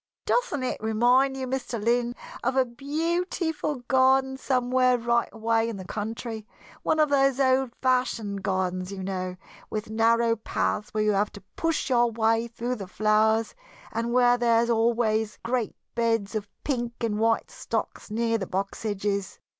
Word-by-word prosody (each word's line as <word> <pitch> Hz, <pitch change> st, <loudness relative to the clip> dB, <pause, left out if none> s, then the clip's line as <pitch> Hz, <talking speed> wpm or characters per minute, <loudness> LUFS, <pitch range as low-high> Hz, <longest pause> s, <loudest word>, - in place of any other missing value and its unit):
"Doesn't 295 Hz, -, 0 dB
it 255 Hz, -, -2 dB
remind 245 Hz, +5 st, +3 dB
you, 260 Hz, -, -3 dB
Mr. 255 Hz, -2 st, -3 dB
Lynn, 240 Hz, +2 st, +1 dB, 0.3 s
of 265 Hz, -, 0 dB
a 265 Hz, -1 st, +4 dB
beautiful 310 Hz, +2 st, -2 dB
garden 265 Hz, 0 st, +4 dB
somewhere 255 Hz, -1 st, +2 dB
right 235 Hz, 0 st, +1 dB
away 225 Hz, 0 st, +1 dB
in 225 Hz, -, -5 dB
the 190 Hz, -, -8 dB
country 220 Hz, +2 st, -5 dB, 0.3 s
one 315 Hz, -, +1 dB
of 305 Hz, -1 st, +4 dB
those 275 Hz, -1 st, +3 dB
old 260 Hz, -2 st, +2 dB
fashioned 235 Hz, -6 st, 0 dB
gardens, 185 Hz, -1 st, -1 dB
you 190 Hz, -1 st, -5 dB
know, 185 Hz, -1 st, -3 dB, 0.3 s
with 215 Hz, 0 st, -4 dB
narrow 230 Hz, +1 st, +3 dB
paths 210 Hz, -1 st, -1 dB
where 215 Hz, 0 st, 0 dB
you 215 Hz, -, +3 dB
have 205 Hz, +1 st, +1 dB
to 205 Hz, -, -10 dB
push 330 Hz, -4 st, -1 dB
your 240 Hz, -1 st, +4 dB
way 225 Hz, +1 st, +1 dB
through 240 Hz, +2 st, -3 dB
the 195 Hz, -3 st, -7 dB
flowers, 215 Hz, +2 st, +2 dB, 0.4 s
and 230 Hz, +1 st, -2 dB
where 245 Hz, 0 st, +4 dB
there 235 Hz, -1 st, +4 dB
are 235 Hz, -, 0 dB
always 225 Hz, -2 st, +1 dB
great 240 Hz, -2 st, -1 dB, 0.2 s
beds 225 Hz, -3 st, 0 dB
of 210 Hz, -2 st, -3 dB
pink 240 Hz, -4 st, -1 dB
and 215 Hz, -3 st, -1 dB
white 225 Hz, 0 st, +1 dB
stocks -, -, -4 dB
near 230 Hz, +1 st, 0 dB
the 190 Hz, -, -4 dB
box 195 Hz, +3 st, -3 dB
edges? 200 Hz, -2 st, -2 dB
230 Hz, 160 wpm, -26 LUFS, 215-255 Hz, 0.4 s, a